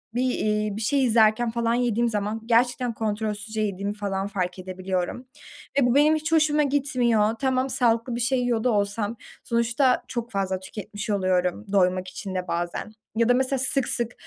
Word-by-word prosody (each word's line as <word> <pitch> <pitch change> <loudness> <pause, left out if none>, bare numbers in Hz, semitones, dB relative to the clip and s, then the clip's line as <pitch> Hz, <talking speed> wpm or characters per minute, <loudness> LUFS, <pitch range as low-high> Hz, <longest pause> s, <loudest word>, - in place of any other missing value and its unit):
bir, 245 - +1
iii, 210 -3 -1
bir - - -4
şey 270 +4 +2
izlerken 225 0 +3
falan 230 0 0
yediğim 240 -1 +1
zaman 210 +1 -2
gerçekten 245 +1 +2
kontrolsüzce 215 0 -3
yediğimi 200 0 -2
falan 200 -1 -3
fark 185 -2 -3
edebiliyorum 185 +4 -4 0.5
ve 270 - +4
bu 245 +1 +2
benim 300 +2 +5
hiç 310 +1 -3
hoşuma 305 -2 +3
gitmiyor. 245 -6 +1
Tamam, 260 0 0
sağlıklı 235 -1 +1
bir - - -3
şey 250 +2 +1
yiyor 240 -3 0
da 250 - +2
olsam 205 +2 -1 0.3
sonuçta 235 +3 +1
çok 240 -1 -5
fazla 190 -2 -1
tüketmiş 205 +2 -7
oluyorum 185 0 0
doymak 185 -1 +2
için 190 +1 -7
de 180 0 -3
bazen 175 +4 -3 0.2
ya 230 +1 +2
da - - +6
mesela 260 +1 +1
sık, 265 0 +3
sık, 235 0 0
225 Hz, 175 wpm, -25 LUFS, 200-245 Hz, 0.5 s, da